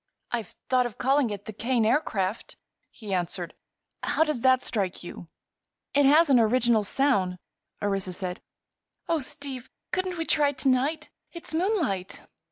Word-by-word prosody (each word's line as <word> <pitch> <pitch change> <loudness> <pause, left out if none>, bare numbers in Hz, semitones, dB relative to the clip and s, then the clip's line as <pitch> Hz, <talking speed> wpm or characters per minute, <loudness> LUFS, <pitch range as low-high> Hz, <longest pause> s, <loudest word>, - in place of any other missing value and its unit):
"I've 235 -3 -3
thought 255 -1 +3
of 235 - -12
calling 270 -1 +2
it 205 -1 -6
the 220 - -6
'Kane 230 +1 +1
Aircraft,'" 220 -5 0 0.3
he 210 -4 -7
answered. 175 -1 -2 0.5
"How 320 - +2
does 305 -7 -2
that 260 0 +4
strike 195 -7 -2
you?" 175 -1 -9 0.7
"It 285 -1 +5
has 315 +4 +6
an 255 - +7
original 235 0 +3
sound," 200 -6 +1 0.5
Orissa 195 -2 -1
said. 180 0 -5 0.7
"Oh, 330 -1 +2
Steve! 265 -2 -4 0.2
couldn't 370 -1 -1
we 325 - -2
try 295 -3 +3
it 285 - -6
to 270 - +3
night? 270 +5 0 0.2
It's 340 -2 -5
moonlight." 320 - -1
250 Hz, 155 wpm, -27 LUFS, 205-285 Hz, 0.7 s, an